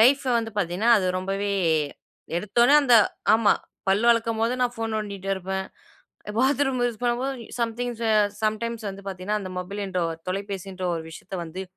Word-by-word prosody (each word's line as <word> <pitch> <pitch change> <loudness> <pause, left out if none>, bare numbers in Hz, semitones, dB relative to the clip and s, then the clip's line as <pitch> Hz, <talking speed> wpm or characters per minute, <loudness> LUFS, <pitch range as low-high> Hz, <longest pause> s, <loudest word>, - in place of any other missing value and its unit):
லைஃப்ப 265 +2 +5
வந்து 225 -1 -4
பார்த்தீங்கன்னா 195 +5 +1
அது 185 - -1
ரொம்பவே 195 +2 -2 0.8
எடுத்தோன 235 +9 +3
அந்த 250 -4 +5 0.4
ஆமா. 220 -2 +4 0.4
பல்ல 195 +3 +3
வெளக்கும்போது 230 0 +1
நான் 245 -1 +2
ஃபோன் 225 -1 -3
நோண்டிட்டு 200 -3 -4
இருப்பேன். 190 +1 -3 0.7
பாத்ரூம் 270 0 +2
யூஸ் 235 -3 -4
பண்ணும்போதும். 245 +2 -1 0.2
சம்திங்ஸ், 235 0 -2 0.4
சம்டைம்ஸ் 220 +1 -1
வந்து 195 +1 -10
பார்த்தீங்கன்னா 195 +2 -2
அந்த 185 - -6
மொபைல்ன்ற 190 0 -3 0.3
தொலைபேசின்ற 195 -1 -4
ஒரு 165 - -4
விஷயத்த 180 +3 -9
வந்து 175 +4 -6
215 Hz, 140 wpm, -25 LUFS, 195-235 Hz, 0.8 s, லைஃப்ப